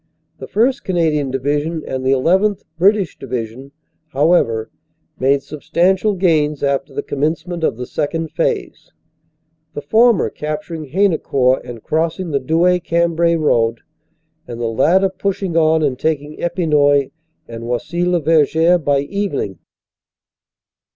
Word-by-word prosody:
The - - -8
1st. 255 +5 +1
Canadian 160 -6 0
Division 145 +5 -2
and 130 0 -4
the 130 +1 +2
llth. 190 +9 +2 0.2
(British) 195 -2 +2
Division, 125 +1 -6 0.4
however, 135 -7 +1 0.5
made 135 +1 +2
substantial 185 +7 0
gains 155 -6 +1
after 140 0 -1
the - - -4
commence 150 +4 -2
ment 175 -2 -5
of 115 - 0
the 125 - -5
Second 160 +4 -3
Phase, - - -3 0.8
the 145 - -4
former 225 +7 +3
capturing 155 +1 -5
Haynecourt 140 -6 +1
and 120 -3 -9
crossing 165 +2 -1
the 140 - +1
Douai 170 +6 +2
Cambrai 170 0 +1
road, 115 -7 +1 0.7
and 120 -1 -7
the 120 - -2
latter 170 +11 +3
pushing 190 -1 -3
on 160 -1 +3
and 135 -4 -1
taking 150 -1 -2
Epinoy 150 -5 +2 0.4
and 115 0 -8
Oisy 125 +9 -2
le 180 0 +2
Verger 160 +2 +3
by 140 -3 +1
evening." 145 - -3
155 Hz, 130 wpm, -18 LUFS, 135-175 Hz, 0.8 s, former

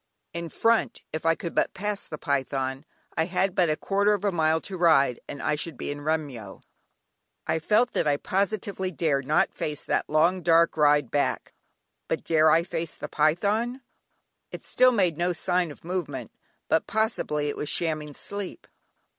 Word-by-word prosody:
In 170 0 -4
front, 230 +7 +1
if 160 +1 -2
I 165 - +4
could 170 - -6
but - - 0
pass 205 +1 -3
the 155 - -6
python, 135 0 -2 0.3
I 160 - +1
had 185 +1 0
but 175 -3 +3
a 155 - +2
quarter 200 +1 +2
of 205 0 -5
a 200 - +2
mile 160 -2 +2
to 195 - -5
ride 150 -8 +3
and 140 - -7
I 155 - +1
should 150 -1 -4
be - - -4
in 145 0 -6
Remyo. 145 -10 -3 0.8
I 160 - 0
felt 220 +9 +2
that - - +1
I 145 -1 +2
positively 195 +1 -1
dared 145 -6 -1
not 155 - +2
face 150 -1 -4
that - - -1
long, 170 +5 +3
dark, 170 -1 +4
ride 145 -4 +3
back; 145 - -1 0.5
but - - -2
dare 160 -1 +4
I 165 +2 +4
face 170 -2 -4
the - - -7
python? 205 - +1 0.7
It - - -9
still 255 0 +4
made 185 -9 +1
no 175 +1 +1
sign 180 +1 0
of 150 - -12
movement; 180 -1 -4 0.4
but 160 - +1
possibly 200 -9 0
it - - -3
was 150 - -3
shamming 155 -3 -1
sleep. 200 - -6
165 Hz, 180 wpm, -26 LUFS, 150-190 Hz, 0.8 s, I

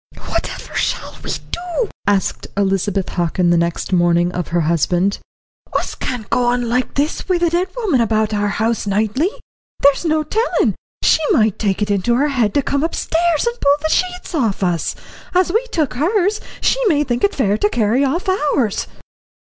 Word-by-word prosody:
"Whatever - - -4
shall - - -2
we - - -6 0.2
do?" 360 +6 -2 0.2
asked 200 -1 0
Elizabeth 195 -1 0
Hockin 175 0 +1
next 170 +2 0
morning 175 0 +3
of 180 -2 -3
her 175 0 0
husband. 175 +4 +1 0.5
"Us - - -1
can't 240 -5 -4
go 250 - +2
on 245 0 +1
like 250 +2 -1
this 295 +6 -1
wi' 365 - +3
the 345 -1 +1
dead 350 +2 +1
woman 375 - +1
about 220 -1 +1
our 205 0 +1
house 220 +2 -1
nightly. 220 - +1 0.5
There's 280 +3 +4
no 310 -2 +1
tellin' 440 +10 +1 0.3
she - - +5
might 220 -6 +2
take 205 -1 0
it 205 - -1
into 200 +4 +1
her 285 +4 +2
head 240 -7 0
to 285 - +3
come 280 +2 0
upstairs 330 -1 0
and 475 0 -2
pull 285 0 +5
the 315 - +1
sheets 360 -1 -2
off 225 - 0
us. 175 -4 0 0.4
As 365 -1 +3
we 450 +3 +2
took 310 - -1
hers, 390 - +1 0.2
she - - +2
may 295 -6 +3
think 240 -3 -2
it 405 - +2
fair 205 -7 +2
to 205 - +2
carry 235 +4 +1
off 325 +9 -1
ours." 290 - 0
245 Hz, 180 wpm, -18 LUFS, 200-325 Hz, 0.5 s, she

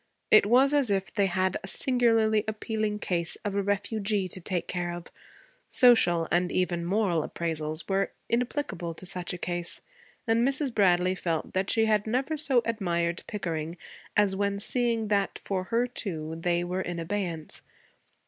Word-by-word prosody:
It 215 -1 +7
was 260 +5 +5
as 280 -5 +3
if 195 -2 -1
they 200 -1 +2
had 185 0 0
a - - -6
singularly 225 -3 +2
appealing 215 -1 -2
case 175 -4 -1
of 205 - -1
a 200 - +1
refugee 205 0 -1
to 185 - -4
take 175 0 -2
care 175 -1 -2
of: 175 0 -7 0.6
social 175 -10 +5
and 175 +1 +2
even 175 -2 0
moral 185 -3 +1
appraisals 155 -1 -2
were 195 0 0 0.2
inapplicable 235 - -2
to 185 - -10
such 180 -1 -1
a 180 - -4
case, 175 0 -3 0.4
and 225 0 +2
Mrs. 270 0 0
Bradley 185 -3 +3
felt 165 -4 -3
that 190 +1 0
she 225 -1 +3
had 215 -1 +1
never 260 +7 0
so 275 -5 +2
admired 175 -6 -1
Pickering 165 -4 -4 0.4
as 205 -2 +3
when 200 0 -1
seeing 230 0 0
that 200 -2 0
for 185 -2 -2
her, 235 +4 +1
too, 165 -10 -4
they 175 +1 0
were 180 +2 -2
in 175 -2 -4
abeyance. 170 -2 -3
195 Hz, 165 wpm, -28 LUFS, 175-220 Hz, 0.6 s, It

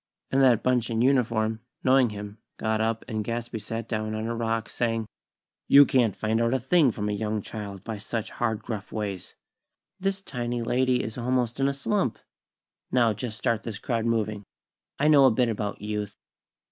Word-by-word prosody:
and 135 - +3
that 125 -4 +5
bunch 125 -2 +2
in 115 -1 -1
uniform, 115 -4 +2 0.2
knowing 130 -2 +5
him, 105 0 -8 0.2
got 110 0 0
up 115 0 -1
and 110 -3 -2
Gadsby 115 +1 -4
sat 115 +2 -5
down 110 -1 -2
on 110 0 -3
a 115 - -2
rock, 115 -1 -1
saying: 115 -2 -1 0.6
"You 140 +1 +9
can't 120 -8 +2
find 110 +3 0
out 115 +2 +2
a - - +1
thing 140 +3 +4
from 105 -1 -3
a - - 0
young 105 0 -2
child 100 -3 -7
by 110 -1 -5
such 110 +1 -4
hard, 110 -2 -2
gruff 105 -4 -5
ways. 100 -4 -4 0.6
This 195 +1 -1
tiny 120 -4 -3
lady 125 +1 +2
is 110 +3 -5
almost 125 0 0
in 135 - +3
a 140 - +1
slump. 160 - 0 0.7
Now, 120 -3 +3
just 110 0 -5
start 115 -2 0
this 110 -3 -5
crowd 115 +1 -2
moving. 110 -3 0 0.5
I 150 - +2
know 145 -3 +7
a - - +8
bit 120 +2 +2
about 105 -2 -3
Youth." 105 -1 -4
115 Hz, 185 wpm, -26 LUFS, 110-125 Hz, 0.7 s, You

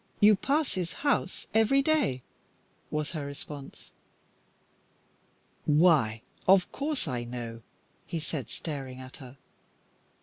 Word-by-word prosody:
You 210 0 +7
pass 285 +9 +1
his 180 -2 -2
house 265 -9 +1
every 225 +6 +4
day," 280 - +2 0.7
was 150 0 -2
her 155 -5 -3
response. 140 0 -8 1.7
"Why, 150 -9 +4 0.2
of 190 -1 +5
course 290 - -1
I 125 -4 -2
know," 120 -1 -6 0.5
he 170 - -2
said, 150 -6 -4
staring 135 -5 -5
at 130 0 -9
her. 130 0 -11
150 Hz, 110 wpm, -29 LUFS, 130-210 Hz, 1.7 s, You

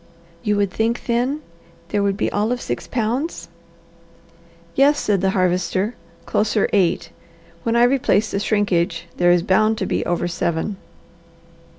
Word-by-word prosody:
"You 210 +1 0
would 200 -2 +1
think, 225 +4 -1
then, 255 +5 0 0.5
there 205 - 0
would 200 -1 0
be - - 0
all 210 +3 0
of 250 - -1
six 120 - -4
pounds? 245 - -2 1.2
"Yes," 285 +2 +4
said 200 -3 +1
the 190 - +2
Harvester, 185 +3 0 0.3
"closer 215 0 +1
eight. 190 -5 +1 0.5
When 230 +4 0
I 235 - +5
replace 240 -5 +2
the 200 - -1
shrinkage 180 -5 0
there 175 0 +4
is 175 -1 +4
bound 215 +4 +3
to 190 - -2
be - - -1
over 175 0 0
seven." 170 +3 -2
205 Hz, 150 wpm, -21 LUFS, 185-235 Hz, 1.2 s, I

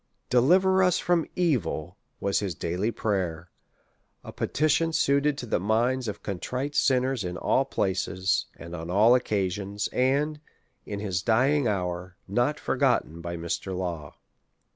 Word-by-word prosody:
Deliver 185 +10 +4
us 180 -2 +4
from 175 -2 +1
evil, 125 - 0 0.2
was 100 0 +1
his 95 -5 -3
daily 90 +8 -1
prayer; 90 -7 -2 0.7
a - - -9
petition 155 +2 +1
suited 140 -1 +2
to 125 - -5
the 110 - 0
minds 115 +6 +1
of 105 - -5
contrite 125 +9 -3
sinners 130 -4 +2
in 90 0 -4
all 135 - +2
places, 95 -4 0
and 85 +1 -8
on 85 0 -6
all 105 +6 +5
occasions; 100 -4 -1
and, 145 +4 +1 0.5
in 100 -1 -4
his 95 -4 -2
dying 130 +6 +2
hour, 90 -3 -2
not 120 +9 0
forgotten 85 +2 0
by 85 0 -5
Mr. 85 +3 -3
Law. 85 -5 -4
105 Hz, 140 wpm, -27 LUFS, 90-135 Hz, 0.7 s, all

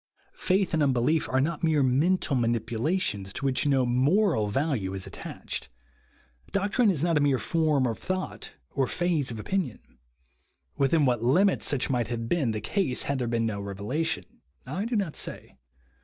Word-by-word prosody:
Faith 190 -1 +1
and 160 - +2
unbe 135 -4 +3
lief 155 +5 +1
are 130 - +2
not 155 +4 -1
mere 155 -3 +3
mental 145 +4 +2
manipulations, 115 - -1
to 140 - -4
which 135 +2 +1
no 135 -3 +3
moral 135 - +2
value 105 -5 -1
is 95 - -4
attached. - - -6 0.8
Doctrine 205 +4 +2
is 165 -6 0
not 170 -2 +2
a - - +3
mere 140 -2 +3
form 155 -3 +1
of 115 -3 -2
thought 185 +1 -4 0.2
or 135 -2 0
phase 170 -5 0
of 115 -2 -5
opinion. 180 - -2 1.0
Within 140 +2 +3
what 120 -3 +1
limits 180 +12 +3
such 140 0 0
might 120 -3 0
have 115 -1 -3
been 145 -4 +1
the 110 -1 -2
case 150 - -1
had 140 -1 -1
there 125 - -1
been 115 -1 0
no 105 -3 -2
revelation, 100 +11 -2 0.4
I 175 +11 -3
do 235 +1 -2
not 195 -7 -1
say. - - -7
140 Hz, 170 wpm, -27 LUFS, 120-170 Hz, 1.0 s, unbe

